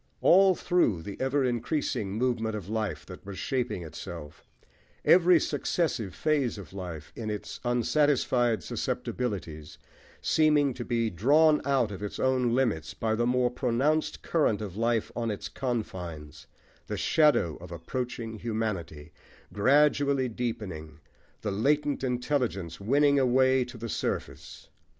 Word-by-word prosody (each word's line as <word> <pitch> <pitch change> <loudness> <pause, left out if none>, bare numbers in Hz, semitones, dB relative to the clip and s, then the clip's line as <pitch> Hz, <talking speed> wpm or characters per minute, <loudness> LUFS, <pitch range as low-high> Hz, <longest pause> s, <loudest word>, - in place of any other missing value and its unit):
All 190 +1 +6
through 115 - +1
the 100 +2 -6
ever 135 +1 +1
increasing 120 -4 -1
movement 115 -1 0
of 100 -4 -6
life 105 -7 -3
that - - -11
was 100 -1 -8
shaping 125 -9 -2
itself; 75 -1 -9 0.6
every 180 -1 +6
successive 145 - -1
phase 145 -7 0
of 95 -4 -10
life, 90 -6 -7
in 110 -2 -4
its 105 -1 -5
unsatisfied 120 -1 +2
susceptibilities, 85 -11 -4 0.4
seeming 150 -3 +3
to 120 - -6
be 115 -2 0
drawn 150 - +4
out 135 -6 +2
of 95 -1 -7
its 105 - -5
own 130 -2 +2
limits 110 -12 0
by 110 -1 -1
the 120 +2 +1
more 125 0 +2
pronounced 140 +6 0
current 150 -11 +1
of 100 -4 -6
life 115 0 0
on 115 -1 -1
its 105 - -4
confines, 90 - -5 0.4
the - - -3
"shadow 150 - +3
of 90 +1 -11
approaching 115 +5 -5
humanity" 100 -10 -4 0.4
gradually 140 +3 +3
deepening, 105 -10 -5 0.4
the 105 - -2
latent 145 +7 +1
intelligence 125 - -1
winning 140 +6 +3
a 135 - +3
way 130 +1 +4
to 120 -1 -10
the 115 +1 -5
surface. - - -4
120 Hz, 135 wpm, -28 LUFS, 100-135 Hz, 0.6 s, All